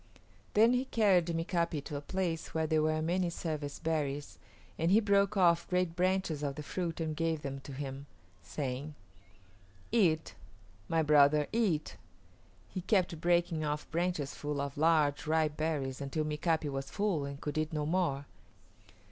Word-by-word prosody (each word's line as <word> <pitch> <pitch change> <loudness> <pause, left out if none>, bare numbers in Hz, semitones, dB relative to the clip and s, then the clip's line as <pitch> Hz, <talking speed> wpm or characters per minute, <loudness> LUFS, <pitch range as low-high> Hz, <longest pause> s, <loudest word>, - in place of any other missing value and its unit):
Then 225 +3 +6
he 250 +1 +1
carried 195 -9 +3
Mika´pi 170 -2 -1
to 150 - -6
a 145 - -3
place 170 0 -3
where 160 0 +1
there 155 0 +2
were 155 0 +1
many 175 +2 +1
service 155 -4 -4
berries, 145 -3 -2 0.4
and 165 +1 +2
he 200 +4 +6
broke 200 -1 +2
off 170 -2 +4
great 180 -2 0
branches 185 -4 0
of 140 -2 -2
the 150 - -6
fruit 170 +2 -3
and 160 -1 -2
gave 160 -1 -1
them 135 0 -4
to 135 - -10
him, 135 0 -6 0.3
saying, 140 +1 -4 1.0
"Eat; 170 -9 +2 0.6
my 165 -1 +2
brother, 150 0 +5
eat." 195 -10 0 0.7
He 185 - -5
kept 180 -4 +1
breaking 175 -2 +2
off 150 0 -3
branches 170 -4 -1
full 145 -1 -4
of 140 -1 -3
large, 155 -2 +2
ripe 155 -1 +2
berries 145 -4 -2
until 140 +3 -2
Mika´pi 155 +1 0
was 135 0 -4
full 200 -8 0
and 140 0 -6
could 150 -1 -4
eat 155 +1 -1
no 150 -2 -1
more. 150 -4 0
160 Hz, 160 wpm, -32 LUFS, 145-175 Hz, 1.0 s, Then